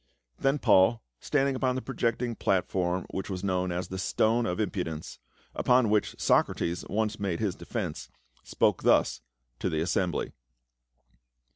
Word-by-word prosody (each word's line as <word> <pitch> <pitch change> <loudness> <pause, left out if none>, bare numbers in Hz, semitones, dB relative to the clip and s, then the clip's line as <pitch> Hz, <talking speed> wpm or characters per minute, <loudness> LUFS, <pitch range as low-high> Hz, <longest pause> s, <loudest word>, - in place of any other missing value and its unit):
Then 135 +2 +2
Paul, 110 -2 +4 0.2
standing 140 -2 +1
upon 130 -1 0
the 130 - -2
projecting 120 -2 -1
platform 90 -3 0
which 95 +1 -4
was 95 -1 -4
known 90 -2 0
as 90 +1 -3
the 95 - -5
"Stone 115 +5 +1
of 90 +2 -2
Impudence," 90 -7 -3 0.3
upon 125 -3 +3
which 105 -1 0
Socrates 85 +1 +1
once 110 0 -1
made 95 -4 -2
his 105 -4 0
defence, - - -5 0.3
spoke - - +1
thus - - +3 0.4
to - - -1
the 80 - -1
assembly. 85 -1 -1
100 Hz, 140 wpm, -28 LUFS, 90-115 Hz, 0.4 s, Paul